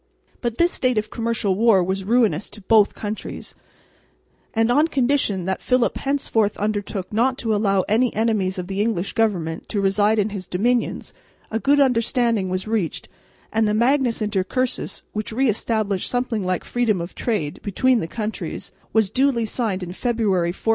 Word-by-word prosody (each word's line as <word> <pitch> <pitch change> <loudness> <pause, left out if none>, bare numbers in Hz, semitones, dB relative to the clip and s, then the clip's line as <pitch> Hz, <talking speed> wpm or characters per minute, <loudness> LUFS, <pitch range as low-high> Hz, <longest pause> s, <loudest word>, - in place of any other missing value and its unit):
But 235 -2 -2
this 345 +1 +3
state 255 -3 0
of 215 0 -1
commercial 230 -4 0
war 205 -2 +4
was 190 +2 -2
ruinous 215 -5 +2
to 210 - -11
both 210 +1 +4
countries; 210 0 -6 1.0
and, 225 +1 +2
on 295 +6 +4
condition 255 - +1
that 190 0 -2
Philip 255 -2 +1
henceforth 230 -7 0
undertook 205 -2 -3
not 250 +4 +2
to 225 -2 -1
allow 200 -2 +2
any 230 +6 +1
enemies 210 -4 0
of 180 - -3
the 195 +2 -2
English 210 -4 -1
government 180 -8 -1
to 205 - -1
reside 205 +2 +2
in 210 0 +1
his 195 -3 -6
dominions, 235 +6 0 0.4
a 225 - 0
good 285 +4 +3
understanding 235 -5 +2
was 185 +2 -3
reached, 215 -7 -2 0.4
and 220 -1 +2
the 210 - +1
Magnus 240 -1 +2
Intercursus, 210 +5 -2
which 215 +1 -3
re 260 +4 +1
established 215 -3 0
something 245 -4 -1
like 185 -1 -1
freedom 230 -6 0
of 170 +2 -6
trade 190 -11 -2
between 250 +5 +2
the 165 - -3
countries, 215 +4 -5 0.2
was 220 -4 +3
duly 260 -3 +2
signed 210 -4 -2
in 175 - -6
February, 205 -5 0
1496. 190 +5 -4
220 Hz, 170 wpm, -22 LUFS, 195-240 Hz, 1.0 s, war